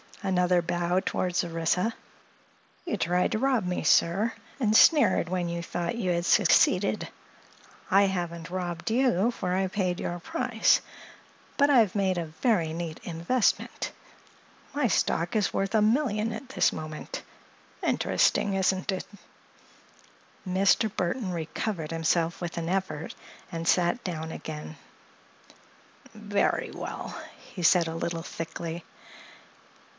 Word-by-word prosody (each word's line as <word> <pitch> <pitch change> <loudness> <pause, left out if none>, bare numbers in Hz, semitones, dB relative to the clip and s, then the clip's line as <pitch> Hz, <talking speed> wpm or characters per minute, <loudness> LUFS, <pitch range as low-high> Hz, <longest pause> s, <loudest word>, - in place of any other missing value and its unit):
Another 180 -2 +2
bow 175 +1 0
toward 185 -1 -2
Orissa. 170 +6 0 0.9
"You 345 - -2
tried 180 +1 +1
to 215 - 0
rob 260 -5 +1
me, 180 0 -2
sir, 200 +7 +3 0.3
and 220 -4 +2
sneered 225 - +5
when 180 -1 -1
you 170 0 -3
thought 170 +4 -3
you 195 -6 -1
had 170 0 0
succeeded. - - +3 0.8
I 195 +1 +5
haven't 175 -3 -2
robbed 175 -1 -3
you, 235 -4 +3
for 180 -6 -3
I 190 +1 +1
paid 185 -2 -1
your 175 0 -3
price; 240 +5 +2 0.8
but 285 0 +4
I've 230 -9 +4
made 190 -2 +1
a 170 - -2
very 165 +1 0
neat 165 -1 -5
investment. 175 +8 0 0.8
My 285 -3 +1
stock 170 -2 0
is 210 -2 +1
worth 195 +1 -1
a 220 - +4
million 220 -1 +1
at 255 +3 -8
this - - +2
moment. 155 -1 -6 0.6
Interesting, 200 - +2
isn't 190 0 +1
it?" 185 - -3 1.4
Mr. 195 +4 +3
Burthon 185 +3 -1
recovered 165 0 -3
himself 165 +1 0
with 170 -1 -5
an 165 0 -2
effort 180 -5 -2 0.4
and 165 0 -4
sat 180 +7 +2
down 160 -3 -4
again. 155 0 -7 1.4
"Very 205 -2 0
well," - - -6 0.3
he 180 - -5
said 170 0 +5
a 160 - -4
little 165 0 -3
thickly. 165 +1 -6
180 Hz, 130 wpm, -27 LUFS, 170-210 Hz, 1.4 s, sneered